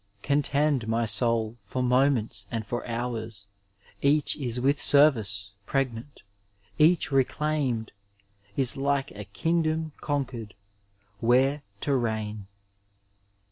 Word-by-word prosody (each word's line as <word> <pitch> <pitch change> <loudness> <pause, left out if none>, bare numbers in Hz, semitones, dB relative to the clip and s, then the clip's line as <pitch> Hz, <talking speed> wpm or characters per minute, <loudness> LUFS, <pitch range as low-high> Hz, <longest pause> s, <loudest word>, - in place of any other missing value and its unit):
Contend, 140 -3 +1
my 115 +1 +1
soul, 115 0 +1
for 130 +5 -3
moments 125 -5 +1
and 115 -3 -4
for 120 +3 -4
hours; 115 -3 -4 0.6
Each 145 +2 +3
is 125 -4 -3
with 140 +3 +1
service 110 -9 +3 0.2
pregnant, 135 0 -3 0.6
each 160 0 +4
reclaimed 135 -3 0 0.7
Is 130 -3 +5
like 140 0 -1
a 105 0 -8
Kingdom 160 - -1
conquered, 130 -7 -3 0.6
where 130 +6 +3 0.2
to 140 - +1
reign. 110 -4 -3
125 Hz, 100 wpm, -27 LUFS, 110-140 Hz, 0.7 s, Is